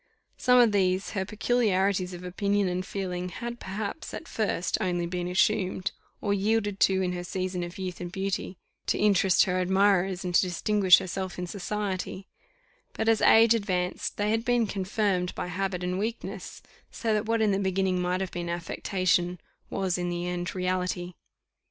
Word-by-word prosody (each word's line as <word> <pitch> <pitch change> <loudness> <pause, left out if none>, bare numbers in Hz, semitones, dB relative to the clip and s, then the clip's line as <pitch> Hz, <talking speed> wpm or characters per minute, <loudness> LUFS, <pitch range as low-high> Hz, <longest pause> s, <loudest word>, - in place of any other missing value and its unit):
Some 250 -1 +4
of 240 -3 +6
these 190 -1 +1
her 190 -3 -2
peculiarities 200 -4 +1
of 180 0 -8
opinion 200 +2 0
and 180 +1 -1
feeling 180 -2 -4
had 235 +4 -6
perhaps, 200 +9 -5
at 325 - -8
first, 205 -5 -1
only 175 -2 0
been 175 0 -3
assumed, 185 0 +1 0.3
or 205 - +1
yielded 205 0 0
to 190 0 +3
in 180 - 0
her 175 0 -4
season 185 0 -3
of 175 0 -6
youth 185 -2 -5
and 175 -1 -5
beauty, 195 -1 -3 0.3
to - - +1
interest 195 -3 +4
her 185 -1 0
admirers 190 0 +2
and 180 - -2
to - - +6
distinguish 185 +1 +4
herself 185 0 -4
in 180 - -3
society; 195 0 -4 0.7
but 220 - -2
as 225 -1 +4
age 225 +1 +7
advanced, 185 -5 -2
they 210 +1 +1
had 225 +1 +1
been 245 -1 +2
confirmed 195 -2 -1
by - - -3
habit 180 0 -2
and 180 +1 -1
weakness, 225 +3 -5 0.3
so 225 -2 -1
that 215 +1 0
what 230 0 +1
in 215 -2 +3
the 195 - +1
beginning 190 -1 +1
might 180 +1 0
have 190 - -3
been 175 -1 -4
affectation, 175 +1 0 0.3
was 185 -2 -1
in 175 0 -1
the 175 0 -3
end 180 +1 -3
reality. 180 -1 -1
190 Hz, 175 wpm, -27 LUFS, 180-205 Hz, 0.7 s, age